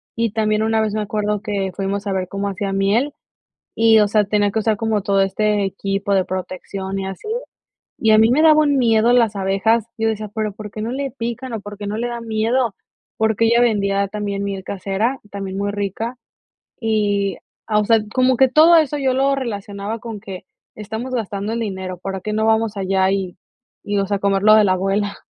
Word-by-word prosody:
y 230 Hz, -1 st, 0 dB
también 215 Hz, 0 st, +1 dB
una 220 Hz, 0 st, +2 dB
vez 215 Hz, -1 st, -1 dB
me 215 Hz, -, -1 dB
acuerdo 210 Hz, 0 st, -1 dB
que 200 Hz, -3 st, -2 dB
fuimos 200 Hz, +1 st, -3 dB
a 195 Hz, -, 0 dB
ver 185 Hz, -1 st, -2 dB
cómo 200 Hz, +2 st, -3 dB
hacía 195 Hz, 0 st, -3 dB
miel 210 Hz, +9 st, +1 dB, 0.6 s
y, 225 Hz, -1 st, +5 dB
o 210 Hz, -, +4 dB
sea, 210 Hz, 0 st, +3 dB
tenía 205 Hz, 0 st, +1 dB
que 220 Hz, -, 0 dB
usar 220 Hz, -1 st, +1 dB
como 220 Hz, -1 st, 0 dB
todo 195 Hz, 0 st, +2 dB
este 205 Hz, +1 st, +1 dB
equipo 195 Hz, +1 st, -2 dB
de 190 Hz, -2 st, +2 dB
protección 190 Hz, +1 st, -5 dB
y 195 Hz, -, -3 dB
así. 195 Hz, -, -8 dB, 0.7 s
Y 220 Hz, -2 st, +4 dB
a 215 Hz, -, +6 dB
mí 220 Hz, +1 st, +5 dB
me 285 Hz, +5 st, +3 dB
daba 310 Hz, -1 st, +6 dB
un 285 Hz, -2 st, +2 dB
miedo 230 Hz, -1 st, +3 dB
las 230 Hz, -4 st, +3 dB
abejas. 195 Hz, +4 st, +1 dB
Yo 225 Hz, 0 st, 0 dB
decía: 215 Hz, -1 st, -2 dB
"Pero, 215 Hz, -2 st, -2 dB
¿por 210 Hz, 0 st, -9 dB
qué 215 Hz, -, -6 dB
no 225 Hz, +2 st, -3 dB
le 275 Hz, 0 st, -3 dB
pican 240 Hz, +1 st, -5 dB
o 225 Hz, -, -2 dB
por 205 Hz, +1 st, -9 dB
qué 205 Hz, -, -6 dB
no 210 Hz, -, -3 dB
le 235 Hz, +2 st, -1 dB
da 240 Hz, -1 st, -5 dB
miedo?". 225 Hz, +1 st, 0 dB, 0.4 s
Porque 220 Hz, 0 st, +2 dB
ella 235 Hz, +1 st, +4 dB
vendía 200 Hz, -3 st, +1 dB
también 200 Hz, 0 st, -3 dB
miel 195 Hz, -1 st, -4 dB
casera, 200 Hz, +7 st, -2 dB
también 195 Hz, -1 st, -5 dB
muy 200 Hz, 0 st, -1 dB
rica. 205 Hz, +4 st, -3 dB, 0.6 s
Y, 205 Hz, -4 st, 0 dB, 0.3 s
ah, 210 Hz, -1 st, +2 dB
o 210 Hz, -, 0 dB
sea, 225 Hz, 0 st, +4 dB
como 255 Hz, -1 st, +3 dB
que 265 Hz, -, +6 dB
todo 320 Hz, +5 st, +6 dB
eso 300 Hz, -2 st, +2 dB
yo 265 Hz, -1 st, +1 dB
lo 270 Hz, +1 st, +2 dB
relacionaba 205 Hz, -3 st, -4 dB
con 225 Hz, -2 st, -7 dB
que 195 Hz, -3 st, -9 dB, 0.3 s
estamos 220 Hz, +5 st, -6 dB
gastando 210 Hz, -2 st, -3 dB
el 230 Hz, -, -2 dB
dinero, 190 Hz, -4 st, -4 dB
¿para 190 Hz, +1 st, -5 dB
qué 210 Hz, +3 st, -3 dB
no 220 Hz, +1 st, +1 dB
vamos 220 Hz, -1 st, +1 dB
allá 190 Hz, -1 st, +1 dB
y 190 Hz, -2 st, -2 dB, 0.5 s
y 205 Hz, 0 st, -2 dB
o 200 Hz, -, +1 dB
sea, 200 Hz, 0 st, -1 dB
comer 195 Hz, 0 st, +1 dB
lo 215 Hz, 0 st, +7 dB
de 215 Hz, -, +6 dB
la 185 Hz, -, +3 dB
abuela? 195 Hz, +2 st, -1 dB
210 Hz, 215 wpm, -20 LUFS, 195-225 Hz, 0.7 s, lo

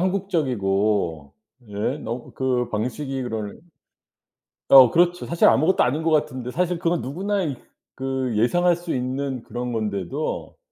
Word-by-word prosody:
한국적이고 105 Hz, -, 0 dB, 0.3 s
예 105 Hz, +8 st, -2 dB
너 120 Hz, -2 st, -6 dB
그 125 Hz, -2 st, 0 dB
방식이 130 Hz, +5 st, -3 dB
그런 110 Hz, -3 st, -5 dB, 1.1 s
어 130 Hz, -3 st, +10 dB
그렇죠. 175 Hz, +3 st, +2 dB
사실 170 Hz, -, +3 dB
아무것도 160 Hz, +7 st, +4 dB
아닌 145 Hz, +6 st, 0 dB
것 165 Hz, -, 0 dB
같은데 130 Hz, -5 st, 0 dB
사실 180 Hz, +2 st, 0 dB
그건 170 Hz, -1 st, 0 dB
누구나 195 Hz, +9 st, -2 dB
이 145 Hz, -6 st, -2 dB, 0.4 s
그 130 Hz, -2 st, -2 dB
예상할 175 Hz, +11 st, +3 dB
수 175 Hz, 0 st, -5 dB
있는 130 Hz, 0 st, -3 dB
그런 120 Hz, +2 st, -5 dB
건데도 100 Hz, -6 st, -3 dB
130 Hz, 275 characters per minute, -23 LUFS, 115-165 Hz, 1.1 s, 어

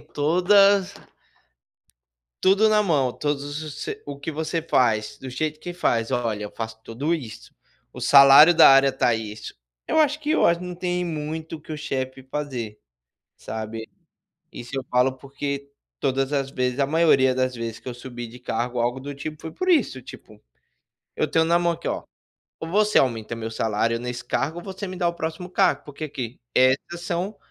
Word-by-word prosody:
todas 185 Hz, +5 st, +3 dB, 1.5 s
tudo 200 Hz, +3 st, +5 dB
na 210 Hz, 0 st, +4 dB
mão, 140 Hz, -9 st, +1 dB
todos 145 Hz, +1 st, -2 dB, 0.2 s
os 155 Hz, -2 st, -8 dB
se -, -, -5 dB
o 140 Hz, -1 st, -7 dB
que 160 Hz, -, -4 dB
você 160 Hz, +2 st, -2 dB
faz, 110 Hz, -8 st, +1 dB
do 135 Hz, -, -9 dB
jeito 155 Hz, +3 st, -3 dB
que 175 Hz, -, -7 dB
faz: 115 Hz, -8 st, 0 dB
"Olha, 115 Hz, -4 st, -1 dB
eu 105 Hz, -, -6 dB
faço 110 Hz, -1 st, -6 dB
tudo 140 Hz, +9 st, -2 dB
isso. 120 Hz, -9 st, -9 dB, 0.4 s
O -, -, -10 dB
salário 140 Hz, +4 st, +8 dB
da -, -, +8 dB
área 135 Hz, 0 st, +6 dB
tá 125 Hz, -2 st, +1 dB
isso." 110 Hz, -1 st, -7 dB, 0.3 s
Eu -, -, 0 dB
acho 300 Hz, 0 st, +2 dB
que 300 Hz, 0 st, -5 dB
eu -, -, +3 dB
acho 170 Hz, 0 st, +3 dB
que 180 Hz, -, -7 dB
não 180 Hz, -, -6 dB
tem 180 Hz, 0 st, -2 dB
muito 160 Hz, 0 st, -4 dB
o 155 Hz, -, -12 dB
que 155 Hz, -, -10 dB
o 155 Hz, -, -4 dB
chefe 130 Hz, -3 st, -4 dB
fazer, 130 Hz, -6 st, -5 dB, 0.6 s
sabe. 110 Hz, 0 st, -6 dB, 0.6 s
Isso 120 Hz, -, -9 dB
eu 135 Hz, -, -3 dB
falo 125 Hz, +1 st, +2 dB
porque, 140 Hz, +1 st, -5 dB, 0.3 s
todas 135 Hz, 0 st, 0 dB
as 135 Hz, -1 st, -1 dB
vezes 125 Hz, 0 st, -1 dB
a 140 Hz, -, +3 dB
maioria 140 Hz, -4 st, +4 dB
das 130 Hz, -1 st, -1 dB
vezes, 115 Hz, -1 st, -5 dB
que -, -, -8 dB
eu 125 Hz, -, -5 dB
subi 120 Hz, -1 st, -8 dB
de 120 Hz, +2 st, -12 dB
cargo 125 Hz, 0 st, -3 dB
ou 120 Hz, -, +2 dB
algo 120 Hz, +2 st, -1 dB
do 140 Hz, +1 st, -7 dB
tipo 155 Hz, +2 st, -7 dB
foi 160 Hz, -, -7 dB
por 370 Hz, -, -4 dB
isso, 285 Hz, -, +2 dB
tipo: 110 Hz, -4 st, -13 dB, 0.8 s
"Eu -, -, 0 dB
tenho 160 Hz, 0 st, +2 dB
na 170 Hz, +1 st, +3 dB
mão 170 Hz, -1 st, +2 dB
aqui, -, -, -8 dB
ó, -, -, -2 dB, 0.6 s
ou 160 Hz, -, -5 dB
você 210 Hz, +4 st, +2 dB
aumenta 115 Hz, -3 st, +1 dB
meu 115 Hz, 0 st, -5 dB
salário 115 Hz, +1 st, 0 dB
nesse 125 Hz, 0 st, -5 dB
cargo 145 Hz, +6 st, -1 dB
ou -, -, -11 dB
você 195 Hz, 0 st, -6 dB
me 185 Hz, -, -6 dB
dá 175 Hz, -1 st, 0 dB
o 170 Hz, -, 0 dB
próximo 165 Hz, +2 st, -5 dB
cargo. 185 Hz, -6 st, +2 dB
porque, 150 Hz, +2 st, -6 dB
aqui, 125 Hz, -4 st, -6 dB, 0.2 s
essas 130 Hz, +7 st, +2 dB
são 180 Hz, +4 st, -3 dB
140 Hz, 195 wpm, -24 LUFS, 125-170 Hz, 1.5 s, salário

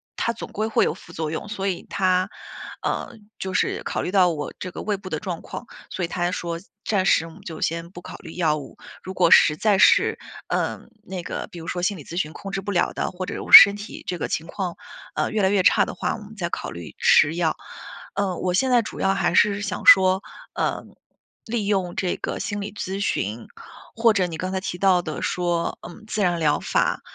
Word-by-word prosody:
它 230 Hz, -, -1 dB
总 230 Hz, -, -8 dB
归 215 Hz, +2 st, -2 dB
会 225 Hz, -, +2 dB
有 -, -, 0 dB
副 -, -, -14 dB
作 155 Hz, -1 st, -3 dB
用。” 160 Hz, -, -5 dB
所 195 Hz, -2 st, -3 dB
以 185 Hz, -3 st, -3 dB
他， 185 Hz, -1 st, +1 dB, 0.6 s
嗯， 215 Hz, -3 st, -5 dB
就 190 Hz, -1 st, -4 dB
是 -, -, 0 dB
考 -, -, -2 dB
虑 -, -, -3 dB
到 185 Hz, -2 st, +5 dB
我 150 Hz, -3 st, -4 dB
这 185 Hz, -, -5 dB
个 -, -, -7 dB
胃 210 Hz, -2 st, -1 dB
部 190 Hz, -1 st, -9 dB
的 155 Hz, -, -2 dB
状 175 Hz, -1 st, -5 dB
况， -, -, -8 dB, 0.2 s
所 185 Hz, -, -4 dB
以 -, -, 0 dB
他 175 Hz, 0 st, -1 dB
说： 170 Hz, -2 st, -4 dB, 0.3 s
“暂 195 Hz, -4 st, +1 dB
时 165 Hz, -, +3 dB
我 -, -, -11 dB
们 -, -, -15 dB
就 160 Hz, -2 st, -8 dB
先 170 Hz, +1 st, -2 dB
不 175 Hz, -, -10 dB
考 -, -, -9 dB
虑 165 Hz, -, -11 dB
药 160 Hz, -4 st, +1 dB
物， 145 Hz, -, -10 dB, 0.3 s
如 190 Hz, -, -6 dB
果 180 Hz, -2 st, +3 dB
实 150 Hz, -, +7 dB
在 205 Hz, +4 st, +2 dB
是， -, -, +5 dB, 0.3 s
嗯， -, -, -2 dB
那 190 Hz, -4 st, -6 dB
个 -, -, -5 dB
比 175 Hz, -, -9 dB
如 165 Hz, -, -9 dB
说 175 Hz, -, -3 dB
心 185 Hz, +2 st, 0 dB
理 150 Hz, -, -10 dB
咨 170 Hz, -, -8 dB
询 155 Hz, -4 st, -2 dB
控 195 Hz, -, -8 dB
制 195 Hz, -, -2 dB
不 205 Hz, +1 st, -4 dB
了 175 Hz, -, +1 dB
的， -, -, -2 dB
或 185 Hz, 0 st, -5 dB
者 200 Hz, -, -5 dB
我 -, -, -9 dB
身 200 Hz, 0 st, +12 dB
体 205 Hz, +1 st, -9 dB
这 180 Hz, -, -2 dB
个 -, -, -3 dB
情 160 Hz, -, -3 dB
况， 180 Hz, 0 st, -4 dB, 0.4 s
呃， -, -, 0 dB
越 215 Hz, -2 st, 0 dB
来 190 Hz, -, +4 dB
越 200 Hz, -1 st, +3 dB
差 -, -, +5 dB
的 -, -, -6 dB
话， -, -, -2 dB
我 225 Hz, -, -10 dB
们 215 Hz, +1 st, -13 dB
再 175 Hz, -5 st, -3 dB
考 -, -, -4 dB
虑 85 Hz, -2 st, -9 dB
吃 155 Hz, +3 st, +5 dB
药。” 170 Hz, -2 st, +1 dB, 0.6 s
嗯， 195 Hz, -3 st, -1 dB
我 180 Hz, -, 0 dB
现 255 Hz, +8 st, +2 dB
在 245 Hz, -1 st, +5 dB
主 -, -, -8 dB
要 195 Hz, 0 st, +2 dB
还 175 Hz, -3 st, 0 dB
是 205 Hz, +1 st, +4 dB
想 205 Hz, -, -4 dB
说， 190 Hz, 0 st, +7 dB, 0.3 s
嗯， -, -, -3 dB, 0.5 s
利 220 Hz, -3 st, -2 dB
用 190 Hz, -4 st, 0 dB
这 180 Hz, -2 st, -1 dB
个 -, -, -4 dB
心 205 Hz, -1 st, -3 dB
理 200 Hz, 0 st, -6 dB
咨 195 Hz, -1 st, -4 dB
询， 115 Hz, -, -2 dB, 0.5 s
或 230 Hz, 0 st, +4 dB
者 195 Hz, -3 st, +2 dB
你 165 Hz, -, -6 dB
刚 185 Hz, +2 st, -3 dB
才 190 Hz, -, -1 dB
提 180 Hz, -1 st, -5 dB
到 185 Hz, -1 st, +3 dB
的 155 Hz, -3 st, -5 dB
说， 175 Hz, -1 st, -1 dB
嗯， 215 Hz, +5 st, -13 dB
自 215 Hz, -, -2 dB
然 175 Hz, -2 st, +2 dB
疗 150 Hz, -2 st, +2 dB
法， -, -, 0 dB
185 Hz, 255 characters per minute, -23 LUFS, 170-200 Hz, 0.6 s, 身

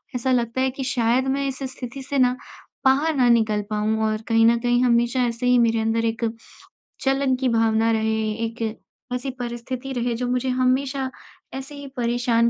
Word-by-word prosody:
ऐसा 255 Hz, +1 st, 0 dB
लगता 240 Hz, 0 st, +1 dB
है 265 Hz, -, +2 dB
कि -, -, -1 dB
शायद 245 Hz, +2 st, +2 dB
मैं 275 Hz, 0 st, -1 dB
इस 265 Hz, 0 st, -4 dB, 0.2 s
स्थिति 260 Hz, +2 st, -7 dB
से 280 Hz, -, 0 dB
ना 250 Hz, -1 st, +4 dB, 0.5 s
बाहर 285 Hz, +4 st, +3 dB
ना 250 Hz, -2 st, +4 dB
निकल 220 Hz, -3 st, +3 dB
पाऊँ 215 Hz, +1 st, 0 dB
और 215 Hz, 0 st, -1 dB
कहीं 225 Hz, -1 st, +4 dB
न 235 Hz, 0 st, +4 dB
कहीं 245 Hz, +1 st, +2 dB
हमेशा 240 Hz, +1 st, +2 dB
ऐसे 235 Hz, +1 st, -3 dB
ही 250 Hz, 0 st, +5 dB
मेरे 230 Hz, -1 st, +3 dB
अंदर 225 Hz, +1 st, 0 dB
एक 230 Hz, +1 st, -1 dB, 0.8 s
जलन 270 Hz, -1 st, +2 dB
की 255 Hz, 0 st, 0 dB
भावना 225 Hz, -1 st, +2 dB
रहे, 220 Hz, -1 st, 0 dB
एक 230 Hz, +1 st, -4 dB, 0.5 s
ऐसी 250 Hz, +2 st, -3 dB
परिस्थिति 245 Hz, +2 st, -5 dB
रहे 240 Hz, -1 st, -1 dB
जो 250 Hz, +1 st, -2 dB
मुझे 250 Hz, +1 st, 0 dB
हमेशा 260 Hz, +1 st, +1 dB, 0.5 s
ऐसे 270 Hz, +2 st, -7 dB
ही 285 Hz, 0 st, -8 dB
परेशान 235 Hz, -1 st, +2 dB
245 Hz, 185 wpm, -23 LUFS, 230-260 Hz, 0.8 s, ही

